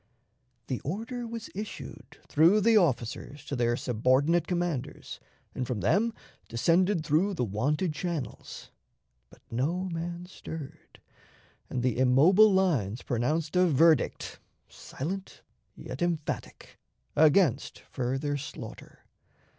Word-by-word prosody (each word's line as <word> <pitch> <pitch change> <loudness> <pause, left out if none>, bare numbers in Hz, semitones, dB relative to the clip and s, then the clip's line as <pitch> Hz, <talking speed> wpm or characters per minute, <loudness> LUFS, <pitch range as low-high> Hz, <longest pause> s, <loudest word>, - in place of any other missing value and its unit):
'The 130 - -3
order 230 - -4
was 230 -1 -7
issued 210 +3 -8
through 170 +8 +5
the 225 +2 +4
officers 145 - 0
to 145 - -4
their 120 -1 +1
subordinate 130 +9 +2
commanders, 175 -7 -3 0.3
and 125 - -3
from 120 -5 -2
them 230 +3 +2 0.4
descended 170 - +2
through 180 +7 +2
the 145 - -1
wonted 145 - 0
channels; 155 -3 -5 0.6
but - - -20
no 150 +10 0
man 170 +1 -5
stirred, 160 -5 -10 0.7
and 125 - -2
the 125 -1 0
immobile 160 +12 +6
lines 140 - +1
pronounced 150 +8 -1
a 180 0 +5
verdict, 160 -1 +2 0.3
silent 190 +8 -7 0.3
yet - - -8
emphatic, 170 -3 -3 0.4
against 155 -3 +3
further 135 +3 -1
slaughter. 135 - -9
155 Hz, 110 wpm, -28 LUFS, 130-180 Hz, 0.7 s, immobile